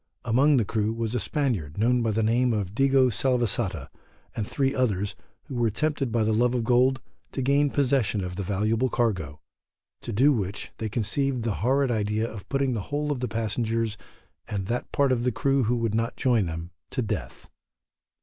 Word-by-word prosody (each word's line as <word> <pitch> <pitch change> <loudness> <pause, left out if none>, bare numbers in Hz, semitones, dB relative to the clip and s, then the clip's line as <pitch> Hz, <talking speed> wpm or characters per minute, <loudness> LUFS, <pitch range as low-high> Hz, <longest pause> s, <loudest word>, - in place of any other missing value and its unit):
Among 135 +5 +4
the 115 - +2
crew 105 +1 0
was 115 0 -3
a 125 - +1
Spaniard 110 - -2
known 120 +3 +3
by 115 - +1
the 110 +1 +1
name 120 +2 +2
of 100 -3 -3
Digo 135 +1 +4
Salvesata, 120 -2 0 0.5
and 105 -2 -2
three 135 -1 0
others, 105 -6 0 0.3
who - - -9
were 120 -2 +1
tempted 140 +2 -1
by 115 - +1
a 110 0 +2
love 120 +3 +2
of 120 - 0
gold 125 +3 +3 0.3
to 135 - -2
gain 140 +2 +3
possession 130 -8 +1
of 90 0 -5
the 100 - -3
valuable 110 +6 0
cargo, 95 -13 -1 0.6
to - - -5
do 135 +8 +4
which, 100 -4 -3
they 110 - -2
conceived 120 +4 -1
the 115 -2 0
horrid 135 +3 +2
idea 110 0 0
of 110 -4 -9
putting 135 -2 +1
the 110 - -2
whole 150 +1 -1
of 140 - -2
the 125 - -1
passengers 115 0 -1 0.5
and 100 -2 -3
that 120 +5 -3
part 140 -2 +2
of 120 -2 +1
the 125 - +2
crew 135 +2 +1
who 120 +3 +1
would 115 -3 -1
not 115 +2 -1
join 120 -7 +2
them 80 +1 -6 0.2
to 130 - -2
death. 105 - -5
115 Hz, 195 wpm, -26 LUFS, 105-130 Hz, 0.6 s, Among